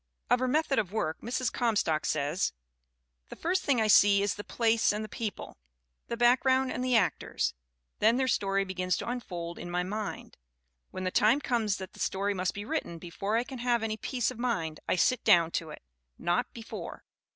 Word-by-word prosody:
Of 245 - +5
her 255 - 0
method 290 0 +2
of 190 -4 -2
work 160 -7 -2
Mrs. 250 +1 -2
Comstock 205 -10 +1
says: 150 - 0 0.8
"The - - -8
first 365 +3 0
thing 270 -4 +2
I 220 - +2
see 200 -1 +6
is 200 - +1
the 205 - -7
place 230 0 +2
and 210 +1 -3
the - - -8
people 215 - -6 0.5
the 235 - -3
background 260 +2 +3
and 250 - -3
the 255 -1 +2
actors. 205 -5 +1 0.5
Then 225 +3 +4
their 260 0 +1
story 195 -4 +1
be 190 - -5
gins 180 -1 0
to - - -5
unfold 175 -9 -5
in 175 - -7
my 180 +1 0
mind. 210 +3 -5 0.5
When 185 - -6
the 185 - -1
time 220 +9 +4
comes 230 -7 0
that 190 -1 -8
that - - -15
story 200 +1 0
must 185 -1 -2
be 205 +1 -5
written 220 - -3
before 195 +6 -2
I 235 - +1
can 260 0 -8
have 240 -1 +1
any 220 -1 -1
peace 245 +2 -1
of 245 - -10
mind, 165 -11 -1
I - - +3
sit 250 +7 +2
down 170 -1 +5
to 165 -1 -2
it 150 - -10 0.3
not 175 +8 0
before. 230 -1 -8
215 Hz, 205 wpm, -29 LUFS, 185-245 Hz, 0.8 s, see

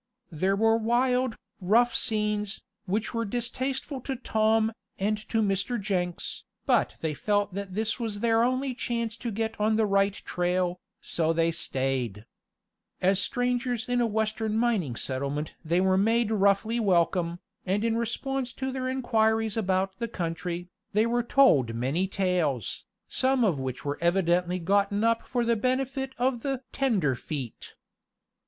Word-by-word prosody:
There 185 +5 +1
were 225 +2 +4
wild, 250 +1 +1 0.2
rough 230 +6 +3
scenes, 210 -3 0 0.3
which 210 +6 -1
were 230 0 0
distasteful 255 +4 -2
to 270 +2 -3
Tom, 220 -2 +2 0.3
and 210 +3 +1
to 225 -1 +2
Mr. 195 +4 0
Jenks, 180 -3 -2 0.2
but - - +2
they 160 -2 -1
felt 205 +4 0
that 195 -1 -5
this 220 +3 -1
was 220 -3 -3
their 230 -1 +3
only 255 +2 +1
chance 235 -3 -2
to 235 - -4
get 220 +1 -2
on 215 +1 +3
the 220 0 +3
right 195 0 +2
trail, 180 0 +1
and 175 - -8 0.2
so 165 -1 0
they 165 0 +2
stayed. 130 -8 -2 0.7
As 190 +1 +3
strangers 245 +1 -1
in 245 0 +1
a 235 - +3
western 220 0 -1
mining 215 - +1
settlement 140 +5 -2
they 170 +2 +1
were 190 0 +3
made 225 +2 +2
roughly 205 +2 +2
welcome, 175 -4 +2 0.3
and 200 +4 0
in 225 -1 +1
response 245 +2 -2
to 265 0 -3
their 260 0 -3
inquiries 225 -4 +1
about 190 -2 0
the 235 - -1
country, 175 -2 -4 0.3
they 215 +2 +4
were 240 +1 +1
told 190 - +4
many 135 +11 0
tales, 180 - -1 0.2
some 260 -1 +2
of 180 -10 +2
which 130 0 -5
were 145 0 -2
evidently 175 0 +2
gotten 200 +3 +1
up 230 0 +1
for 245 -2 0
the 235 0 +3
benefit 265 +3 -1
of 245 -1 0
the 270 -1 -2
"tenderfeet." 150 - -1
215 Hz, 150 wpm, -27 LUFS, 180-235 Hz, 0.7 s, were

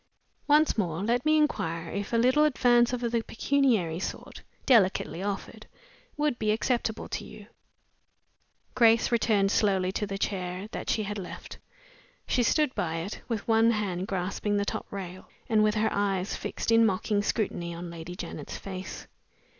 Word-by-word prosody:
Once 300 -4 +4
more, 175 -2 -1
let 240 +3 +1
me 310 0 +4
inquire 170 - 0
if 200 0 -4
a 230 - +2
little 255 +6 +4
advance 245 -5 +4
of 250 -1 -2
the 235 -1 0
pecuniary 225 - +1
sort - - -6 0.2
(delicately 190 -7 +3
offered) 200 0 -5 0.5
would 295 -4 0
be 215 - 0
acceptable 225 0 0
to - - -4
you?" - - -11 1.3
Grace 230 -2 +4
returned 215 -4 +2
slowly 190 -4 +2
to 210 +2 -2
the 195 0 -4
chair 185 -1 -3
that - - -5
she 215 - +1
had 205 0 -4
left. 180 - -9 0.7
She 250 - +2
stood 295 +3 +2
by 165 -2 -2
it, 170 +5 -5
with 225 -4 -3
one 225 0 +4
hand 195 -5 -1
grasping 200 +2 -1
the 200 - 0
top - - -4
rail, 185 -2 -7 0.2
and 220 -3 +3
with 215 0 +2
her 220 +1 +2
eyes 195 -1 0
fixed - - -3
in 230 0 +6
mocking 205 0 +1
scrutiny 195 -5 -2
on 170 0 -7
Lady 170 +1 -8
Janet's - - -6
face. 190 -1 -7
210 Hz, 160 wpm, -28 LUFS, 185-235 Hz, 1.3 s, in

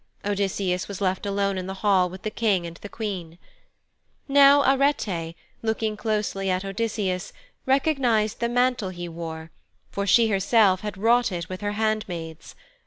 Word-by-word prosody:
Odysseus 195 -2 -1
was 200 -2 -6
left 190 0 -1
alone 200 -1 0
in 185 - -5
the 190 - -5
hall 185 -3 +4
with 185 +1 -11
the 215 - -3
King 205 -6 +1
and 170 0 -7
the 205 - -10
Queen. 185 -8 -5 0.9
Now 280 0 +6
Arete, 225 - +1 0.3
looking 220 -1 -1
closely 210 -3 -2
at 185 +1 -1
Odysseus, 195 -2 -2 0.4
recognized 260 -6 +2
the 235 0 0
mantle 245 -4 +1
he 175 -1 -6
wore, 165 -1 -7 0.4
for 200 0 -3
she 225 +3 +5
herself 195 -1 +3
had 210 -2 -5
wrought 235 +3 +3
it 170 -2 -4
with 185 +1 -6
her 205 0 -2
handmaids. 195 -7 -3
200 Hz, 155 wpm, -25 LUFS, 185-225 Hz, 0.9 s, Now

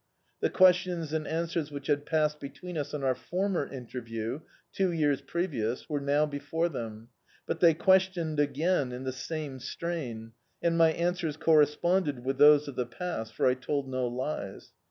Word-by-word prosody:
The - - +1
questions 180 -4 +3
and 155 -1 -1
answers 165 -1 -2
which 140 -2 -7
had 145 -1 0
passed 150 -1 +1
between 150 +6 -8
us 145 -2 -3
on 145 - -4
our 130 -1 +3
former 180 +2 -2
interview, 120 -1 -5 0.2
— - - -35
two 190 -2 +2
years 145 -4 +1
previous, 135 -7 -2
were 150 -2 -1
now 145 +2 +2
before 150 +3 -2
them. 115 -5 -7 0.4
But - - -3
they 165 -3 +6
questioned 185 -4 +2
again 145 0 +1
in 125 +1 -6
the 130 - -2
same 140 +1 -5
strain, 125 -9 -5 0.3
and 170 -1 +1
my 165 -1 +5
answers 170 -2 -1
corresponded 150 -2 +2
with 135 0 -1
those 150 0 +7
of 140 - -6
the 125 -1 -1
past, 120 -5 -5
for - - +1
I 130 - +5
told 135 +2 -2
no 130 -1 -1
lies. 125 -5 -5
150 Hz, 175 wpm, -29 LUFS, 130-170 Hz, 0.4 s, those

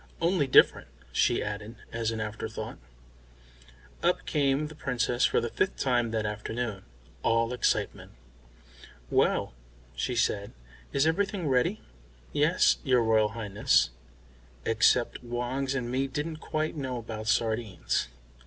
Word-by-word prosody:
"Only 170 -4 +2
different," 130 - +5 0.2
she - - +2
added, 105 +2 -5 0.2
as 115 -1 -1
an 115 -1 -3
afterthought. 110 0 -5 1.2
Up - - +1
came 140 0 +1
the 155 - -7
Princess 125 -4 0
for - - +3
the 120 - -2
fifth 190 - 0
time 120 -3 +1
that 110 -1 -1
afternoon, 105 0 -4 0.4
all 115 +1 +2
excitement. 125 - -1 1.0
"Well," - - +2 0.4
she 120 - -2
said, 100 -3 0 0.4
"is 140 +1 +2
everything 190 +1 0
ready?" 140 +10 +1 0.5
"Yes, 150 +5 +4
your 125 -4 +3
Royal 110 -1 +3
Highness. 105 - +2 0.7
Except 115 +3 +2
Woggs 125 +3 -2
and 120 -2 -2
me 135 +2 0
didn't 150 +4 -4
quite 155 0 -2
know 130 -4 -3
about 110 -2 -6
sardines." 110 - 0
120 Hz, 125 wpm, -28 LUFS, 110-140 Hz, 1.2 s, different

